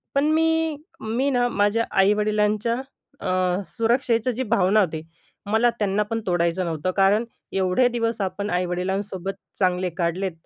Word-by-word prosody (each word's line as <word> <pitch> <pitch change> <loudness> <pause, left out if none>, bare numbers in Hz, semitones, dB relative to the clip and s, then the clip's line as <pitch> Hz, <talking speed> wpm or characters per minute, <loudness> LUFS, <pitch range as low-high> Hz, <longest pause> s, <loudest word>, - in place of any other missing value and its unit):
पण 280 +1 +3
मी 320 -1 +2 0.2
मी 235 +6 0
ना 245 -2 +2
माझ्या 205 +2 +1
आई-वडिलांच्या 210 +2 +2 0.5
अ, 185 0 0
सुरक्षेची 235 0 +1
जे 255 +3 -2
भावना 210 -3 +3
होती, 160 -5 -1 0.5
मला 220 +3 +3
त्यांना 205 0 +1
पण 225 +2 -3
तोडायचं 175 0 +1
नव्हतं 165 +2 -2
कारण 200 +4 +4 0.3
एवढे 190 +6 +2
दिवस 230 -2 -1
आपण 195 +2 -2
आई-वडिलांसोबत 185 +2 -2 0.3
चांगले 180 -1 +1
काढलेत 180 +2 -1
205 Hz, 130 wpm, -23 LUFS, 185-230 Hz, 0.5 s, कारण